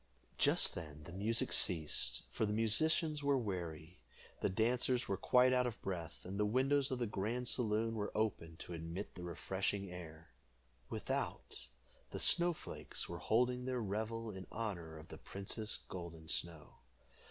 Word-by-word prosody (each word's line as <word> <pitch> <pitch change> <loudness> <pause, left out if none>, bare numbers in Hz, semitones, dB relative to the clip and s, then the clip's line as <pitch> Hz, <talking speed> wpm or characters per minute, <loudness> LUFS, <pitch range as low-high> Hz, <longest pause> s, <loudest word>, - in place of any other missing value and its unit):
Just - - +4
then 75 -3 -7
the 85 - -10
music 110 +5 +2
ceased, 75 - +2
for 110 - 0
the 105 - -1
musicians 150 +8 +3
were 140 -1 +3
weary. 90 -6 -4 0.4
The - - +1
dancers 120 +5 +1
were 100 - 0
quite 125 +6 +4
out 125 -1 +3
of 115 - -5
breath, 85 -4 -5
and 95 +2 -4
the 105 - +3
windows 135 +4 +3
of 130 - -1
the 120 - 0
grand 115 +4 -2
saloon 115 -2 +2
were 105 -2 -2
opened 90 -7 -1
to 90 - -7
admit 85 +4 -5
the 90 - -9
refreshing 95 +3 -2
air. 80 -2 -9 0.6
Without, 60 - -3 0.4
the - - -5
snow 175 0 +6
flakes 165 - -5
were 85 - -6
holding 125 +4 +2
their 130 -1 -1
revel 110 +2 -2
in 95 -2 -8
honor 85 -8 -4
of 80 +1 -12
the - - -9
princess 105 +3 -1
Golden 85 -3 -7
Snow. 85 -2 -1
105 Hz, 160 wpm, -37 LUFS, 85-120 Hz, 0.6 s, snow